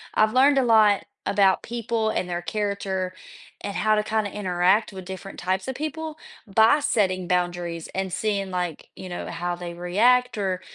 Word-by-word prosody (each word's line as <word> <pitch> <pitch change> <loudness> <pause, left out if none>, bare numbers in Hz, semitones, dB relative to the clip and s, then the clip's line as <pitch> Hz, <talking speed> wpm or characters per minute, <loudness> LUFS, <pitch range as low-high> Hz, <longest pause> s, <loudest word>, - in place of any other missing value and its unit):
I've 215 0 +3
learned 275 +2 +5
a 265 - +4
lot 215 -3 +5 0.2
about 195 -2 +3
people 230 -1 -1
and 180 -4 -2
their 175 0 -2
character 195 -2 -2 0.5
and 200 - -5
how 215 0 +2
to 210 - +1
kinda 215 -2 -1
interact 190 +2 +1
with 190 -1 -8
different 190 +1 -8
types 190 +5 -1
of 265 - -2
people 310 +2 -5 0.3
by 220 +8 +5
setting 185 -8 0
boundaries 175 -2 -1
and 190 -1 -2
seeing, 200 -1 -1
like, 180 -4 -4
you 185 - -8
know, 175 - -5
how 175 +1 -3
they 175 -1 -7
react 225 +8 +2
or, 190 -2 -1
195 Hz, 175 wpm, -24 LUFS, 180-220 Hz, 0.5 s, learned